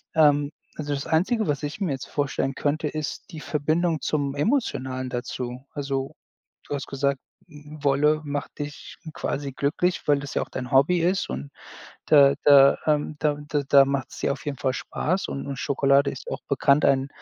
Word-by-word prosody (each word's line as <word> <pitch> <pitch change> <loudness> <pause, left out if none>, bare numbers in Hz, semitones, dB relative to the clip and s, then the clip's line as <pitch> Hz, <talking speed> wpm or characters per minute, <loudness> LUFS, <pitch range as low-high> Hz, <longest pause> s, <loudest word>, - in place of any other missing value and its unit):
Ähm, 145 -2 +4 0.3
also, 145 -1 -3
das 140 0 -3
Einzige, 200 +7 +1
was 145 0 -1
ich 145 +4 -4
mir 185 -6 0
jetzt 135 -1 -4
vorstellen 140 -1 -1
könnte, 150 +2 -1
ist 155 0 -4
die 160 - -7
Verbindung 155 +2 0
zum 140 -2 -1
Emotionalen 130 - -1
dazu. 125 +1 -5
Also, 135 -2 -3 0.5
du - - -2
hast 140 - -5
gesagt, 140 0 -1 0.3
W 150 -2 -12
Wolle 150 +2 +3
macht 145 0 -4
dich 145 0 -7 0.2
quasi 140 -3 -3
glücklich, 155 +6 -1
weil 145 -1 +4
das 145 -1 -7
ja - - +2
auch - - -14
dein 125 -1 -6
Hobby 140 +7 +4
ist 180 +3 +1
und 65 +2 -5 0.6
da 140 -2 +6
da, 140 -1 +7
ähm 150 0 +1
da 150 -2 +1
da 145 -1 0
da 140 -1 +7
macht's 140 -1 -3
dir - - 0
auf 140 - -8
jeden 140 -3 -3
Fall 130 0 0
Spaß 185 +8 -2
und 140 - -5
und 140 -2 -5
Schokolade 140 0 +2
ist 130 - -8
auch - - -4
bekannt, 140 +1 +3
ein 135 0 +3
145 Hz, 185 wpm, -25 LUFS, 135-150 Hz, 0.6 s, da